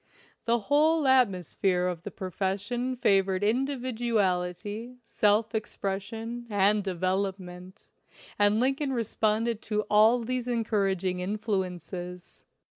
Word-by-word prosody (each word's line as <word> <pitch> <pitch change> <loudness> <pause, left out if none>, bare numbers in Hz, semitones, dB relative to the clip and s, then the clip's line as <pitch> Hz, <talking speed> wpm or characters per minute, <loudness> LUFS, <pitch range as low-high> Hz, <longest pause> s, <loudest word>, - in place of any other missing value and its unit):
The 235 0 +2
whole 300 +5 +3
atmosphere 190 - +2
of 180 -2 -2
the - - -6
profession 200 +7 -3
favored 195 -4 +2
individuality, 225 -4 -1
self 215 +1 +1
ex 220 -1 -4
pression, 225 +5 -4
and 205 0 +3
development, 185 0 -3 0.5
and 205 +1 +4
Lincoln 270 +2 0
re 235 -2 0
sponded 220 +1 0
to 210 -1 -1
all 220 +3 +5
these 250 +1 -3
encouraging 195 -6 0
influences. 180 -3 -4
210 Hz, 105 wpm, -28 LUFS, 190-235 Hz, 0.5 s, all